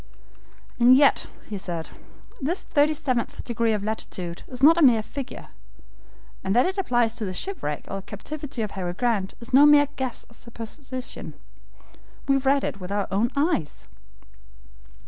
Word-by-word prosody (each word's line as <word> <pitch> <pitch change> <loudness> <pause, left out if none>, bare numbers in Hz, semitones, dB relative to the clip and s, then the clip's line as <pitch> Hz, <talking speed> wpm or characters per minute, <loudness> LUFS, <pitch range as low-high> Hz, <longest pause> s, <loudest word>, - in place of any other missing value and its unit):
"And 245 +2 +7
yet," 280 0 +4 0.2
he 205 -2 -5
said, 170 -4 -5 0.5
"this 330 +8 -1
thirty 300 +1 +2
seventh 260 -6 -1
degree 235 -2 0
of 210 -2 -1
latitude 185 -5 -4
is 255 0 -8
not 330 +3 +7
a - - +2
mere 240 -7 +6
figure, 275 +3 -7 0.9
and 195 - 0
that 245 - +5
it 380 +1 -1
applies 240 -10 +2
to 225 - -3
the 185 -1 -4
shipwreck 180 - -4
or 195 0 -4
captivity 265 +5 -5
of 210 - -4
Harry 180 -2 -4
Grant, 210 -2 -1
is 235 +2 -9
no 285 +3 +8
mere 290 -1 +6
guess 260 -3 -3
or - - -19
supposition. 245 - -6 0.9
We 275 0 +4
read 275 +1 +2
it - - -3
with 185 0 -7
our 205 -1 0
own 210 +5 +2
eyes." 285 - -1
240 Hz, 160 wpm, -25 LUFS, 205-280 Hz, 0.9 s, no